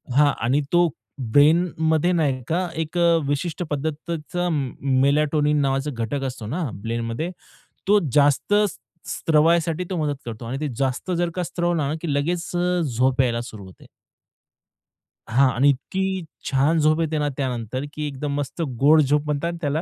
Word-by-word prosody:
हां 145 0 +5
आणि 135 +5 +2
तो 175 0 +4 0.3
ब्रेनमध्ये 160 +5 +3
नाही 145 -7 +1
का 180 +3 0
एक 160 +2 -5
अ, 170 -1 +4
विशिष्ट 155 +4 -2
पद्धतीचा 160 +4 -3
मेलाटोनिन 145 +2 +1
नावाचा 135 +1 0
घटक 120 +4 -3
असतो 125 -4 -5
ना, 160 +10 -2
ब्रेनमध्ये. 115 - -3 0.6
तो 205 +1 +5
जास्त 145 +6 +3 0.5
स्त्रवायसाठी 165 +2 +2
तो 185 - -2
मदत 150 -3 -1
करतो 115 0 -7
आणि 125 +4 -4
ते 155 - -1
जास्त 135 +7 -1
जर 175 0 +1
का 180 - -1
स्त्रवला 175 -3 -1
ना 145 - -1
की 165 -4 -2
लगेच 165 +4 -1
अ, 180 0 +1 0.2
झोप 130 +2 +3
यायला 120 -2 0
सुरू 110 -4 -9
होते. 95 - -15 1.4
हां 130 +4 +4
आणि 135 +5 +4
इतकी 190 +7 -1 0.3
छान 145 +4 +2
झोप 155 +1 +3
येते 160 -1 -1
ना 150 - 0
त्यानंतर 130 -1 -3
की 150 -1 -3
एकदम 140 0 -4
मस्त 145 +3 -4 0.2
गोड 155 +3 +6
झोप 145 +1 +1
म्हणतात 150 +3 -1
त्याला, 150 +1 0
150 Hz, 155 wpm, -23 LUFS, 135-165 Hz, 1.4 s, गोड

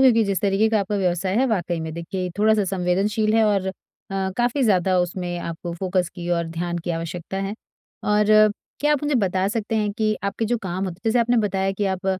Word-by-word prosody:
क्योंकि 245 -4 +6
जिस 195 -3 -1
तरीके 200 +2 +2
का 220 -1 +2
आपका 200 +1 -2
व्यवसाय 185 0 0
है, 255 - +4
वाक़ई 175 -7 -1
में 160 0 -4
देखिए 180 +2 -4
थोड़ा-सा 215 0 +4
संवेदनशील 195 +4 +1
है 225 - +5
और 200 -3 +1
अ, - - -3 0.6
काफ़ी 245 +3 +1
ज़्यादा 185 -4 +3
उसमें 175 0 -3
आपको 170 0 -5
फोकस 185 0 0
की 175 -1 -6
और 170 -1 +1
ध्यान 175 +1 -3
की 175 +1 -4
आवश्यकता 165 +2 -4
है 195 +1 -3 0.6
और 210 0 +4 0.6
क्या 295 +1 +3
आप 295 - 0
मुझे 295 0 0
बता 190 -4 +1
सकते 225 +1 -2
हैं 210 -1 0
कि 215 -1 +2
आपके 200 +3 -1
जो 240 +2 +1
काम 185 +1 -2
होते 185 - -4
हैं, - - -28
जैसे 225 +2 +2
आपने 240 +1 +3
बताया 195 0 0
कि 200 +1 -2
आप 190 +1 -8
195 Hz, 215 wpm, -23 LUFS, 175-215 Hz, 0.6 s, क्योंकि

